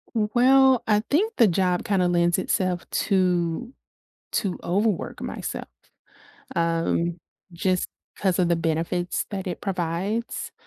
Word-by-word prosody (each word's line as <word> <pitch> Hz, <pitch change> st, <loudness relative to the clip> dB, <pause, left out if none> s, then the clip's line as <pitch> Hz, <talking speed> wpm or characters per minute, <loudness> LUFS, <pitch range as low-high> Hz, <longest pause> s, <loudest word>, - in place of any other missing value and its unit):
W 215 Hz, -2 st, +2 dB
well, 265 Hz, 0 st, +5 dB
I 210 Hz, -1 st, +4 dB
think 420 Hz, +10 st, +1 dB
the 230 Hz, -, +6 dB
job 180 Hz, -1 st, +1 dB
kinda 190 Hz, -3 st, +2 dB
lends 175 Hz, 0 st, +2 dB
itself 185 Hz, -1 st, -1 dB, 0.2 s
to 185 Hz, +4 st, +1 dB, 0.6 s
to 195 Hz, -4 st, -1 dB
overwork 200 Hz, +2 st, -1 dB
myself, -, -, -5 dB, 0.9 s
um, 170 Hz, +1 st, 0 dB, 0.3 s
just 180 Hz, +2 st, 0 dB, 0.3 s
'cause 190 Hz, -3 st, 0 dB
of 180 Hz, -2 st, +3 dB
the 170 Hz, -, +3 dB
benefits 165 Hz, +2 st, -1 dB
that 195 Hz, -2 st, -4 dB
it 180 Hz, -, -5 dB
provides, 190 Hz, +5 st, -3 dB
185 Hz, 125 wpm, -24 LUFS, 175-210 Hz, 0.9 s, the